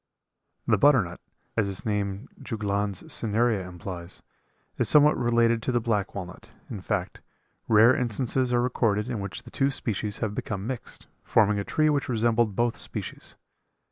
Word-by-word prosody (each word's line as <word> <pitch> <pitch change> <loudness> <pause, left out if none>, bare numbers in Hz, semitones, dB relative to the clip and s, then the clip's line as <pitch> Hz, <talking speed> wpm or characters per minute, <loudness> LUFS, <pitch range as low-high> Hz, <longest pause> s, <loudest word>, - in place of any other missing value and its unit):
The - - +2
butternut, 125 -12 +3 0.3
as 105 -3 +1
its 95 - -3
name 105 +1 -2
Juglans 100 -4 -2
cinerea 110 -3 +1
implies, 90 0 -7 0.6
is - - +2
somewhat 150 0 +6
related 115 -1 +2
to 130 - -1
the 120 - +2
black 105 -4 -1
walnut, 90 -2 -8 0.2
in - - -5
fact, - - -3 0.5
rare 115 +3 +6
instances 125 +2 0
are 120 0 +2
recorded 115 -4 0
in 120 -4 -3
which 100 +5 -6
the 120 - -13
two 135 0 +1
species 105 -5 -2
have 110 -3 -2
become 100 -1 -4
mixed, 125 0 -6 0.2
forming 105 -2 +3
a - - -2
tree 155 +8 +1
which 140 -3 -1
resembled 115 -2 +1
both 120 0 0
species. - - -4
110 Hz, 155 wpm, -26 LUFS, 100-120 Hz, 0.6 s, somewhat